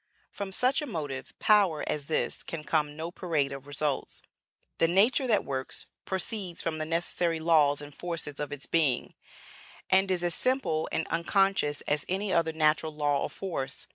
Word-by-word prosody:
From 200 -1 -5
such 255 +9 +2
a 295 - -4
motive 145 - -5
power 200 -7 +4
as 145 -2 -2
this 160 - -1
can 160 -2 -6
come 150 -2 0
no 165 +2 -5
parade 160 -7 -1
of 135 0 -8
results. 145 -1 -2 0.6
The 165 - +5
nature 220 +9 +4
that 215 -4 +2
works, 130 -1 -4 0.2
proceeds 190 -2 -1
from 155 -1 -1
the 155 - -2
necessary 170 0 0
laws 150 -3 +4
and 145 0 -9
forces 165 -3 -4
of 145 -1 -3
its 145 -2 -4
being, 150 -7 +1 0.8
and 190 +1 +4
is 180 -2 0
as 175 -1 +1
simple 255 -10 0
and 160 - -1
unconscious 170 -2 +1
as 150 0 0
any 190 +1 0
other 165 -1 +2
natural 155 0 +2
law 145 -2 +1
or - - -1
force. 140 -9 -5
160 Hz, 170 wpm, -29 LUFS, 145-190 Hz, 0.8 s, The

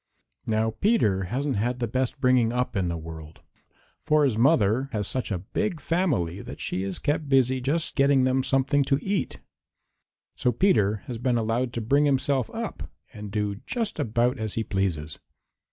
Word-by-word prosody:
Now 110 0 +1
Peter 105 - +1
hasn't 130 +3 -1
had 120 +3 -1
the 125 - -1
best 130 +4 -2
bringing 125 -3 +3
up 125 +1 -1
in 95 -3 0
the 85 -1 -2
world, 80 -1 -10 0.6
for 150 -1 +3
his 130 -6 +1
mother 120 0 +3
has 105 -2 -1
such 130 -2 -2
a 100 - -1
big 170 - -3
family 135 - 0
that - - -9
she 95 - -2
is 95 -1 -3
kept 145 0 -1
busy 130 -1 +3
just 155 +6 -1
getting 140 -1 +4
them 130 +1 +2
something 135 +2 +2
to 135 - +2
eat. 195 +4 -2 0.9
So 125 - +1
Peter 110 - +2
has 125 -5 -6
been 125 0 +1
allowed 115 +2 0
to 115 - -3
bring 140 +7 +3
himself 135 -2 +1
up - - -6 0.2
and 105 -1 -8
do 105 -1 -2
just 230 -4 -2
about 120 +3 +1
as 110 -2 -3
he 115 - 0
pleases. 85 -7 -2
125 Hz, 175 wpm, -26 LUFS, 105-140 Hz, 0.9 s, getting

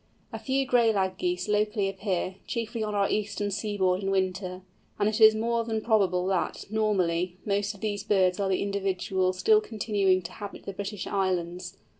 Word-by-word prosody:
A - - -4
few 270 0 0
Gray 240 -3 +4
Lag 190 -3 0
Geese 180 +1 -1
locally 210 -1 +1
appear, 190 -2 -2
chiefly 230 -1 -3
on 210 -1 -2
our 200 -1 +2
eastern 205 -1 -2
seaboard 200 -2 0
in 195 - -2
winter, 185 -1 -1 0.3
and 205 - +2
it 215 +1 -1
is 220 0 +8
more 230 +1 0
than 225 -1 -2
probable 195 -5 +2
that, 190 -2 -1
normally, 185 -5 0
most 205 +1 0
of 200 - -16
these 205 -2 -2
birds 190 -3 +2
are 195 -1 0
the 190 - +1
individuals 190 -2 -1
still 430 - +4
continuing 200 - +1
to 170 - -7
inhabit 205 -2 -8
the 195 - -5
British 200 0 -5
Islands. 180 -1 -2
200 Hz, 180 wpm, -27 LUFS, 185-215 Hz, 0.3 s, is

